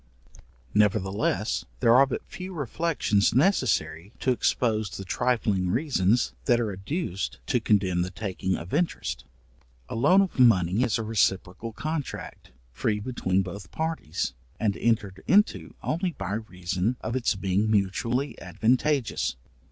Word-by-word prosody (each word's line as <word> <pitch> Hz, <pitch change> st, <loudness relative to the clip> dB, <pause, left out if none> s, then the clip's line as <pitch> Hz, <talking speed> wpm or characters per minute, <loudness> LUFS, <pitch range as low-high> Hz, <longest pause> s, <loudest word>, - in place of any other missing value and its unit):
Nevertheless, 105 Hz, 0 st, +1 dB, 0.2 s
there 115 Hz, -2 st, +5 dB
are 135 Hz, +3 st, +6 dB
but -, -, -4 dB
few 185 Hz, 0 st, -8 dB
reflections 145 Hz, -8 st, +1 dB
necessary 115 Hz, -, +1 dB
to 130 Hz, -, +2 dB
expose 110 Hz, -4 st, +1 dB
the 95 Hz, -, -7 dB
trifling 105 Hz, -5 st, 0 dB
reasons 115 Hz, -, +1 dB
that 120 Hz, -, +4 dB
are 115 Hz, -3 st, -1 dB
adduced 95 Hz, -, -3 dB
to 120 Hz, -, +1 dB
condemn 95 Hz, -5 st, +2 dB
the 90 Hz, -, -1 dB
taking 95 Hz, -1 st, -2 dB
of 85 Hz, +2 st, -7 dB
interest. 170 Hz, -, -1 dB, 0.6 s
A -, -, -5 dB
loan 150 Hz, +12 st, +5 dB
of 185 Hz, -, -5 dB
money 100 Hz, -4 st, +5 dB
is 120 Hz, -3 st, +2 dB
a 115 Hz, -, -3 dB
reciprocal 105 Hz, 0 st, 0 dB
contract, 155 Hz, +4 st, -5 dB, 0.2 s
free 105 Hz, -, -1 dB
between 95 Hz, -5 st, 0 dB
both 95 Hz, -1 st, -8 dB
parties, 155 Hz, -, -3 dB, 0.3 s
and 105 Hz, -3 st, +1 dB
entered 105 Hz, -5 st, 0 dB
into 205 Hz, +3 st, +2 dB
only 170 Hz, +2 st, -1 dB
by 95 Hz, -5 st, -4 dB
reason 95 Hz, +1 st, -2 dB
of 110 Hz, +3 st, -3 dB
its 125 Hz, -4 st, +1 dB
being 95 Hz, +2 st, 0 dB
mutually 110 Hz, +7 st, 0 dB
advantageous. 125 Hz, -, 0 dB
110 Hz, 135 wpm, -26 LUFS, 95-130 Hz, 0.6 s, are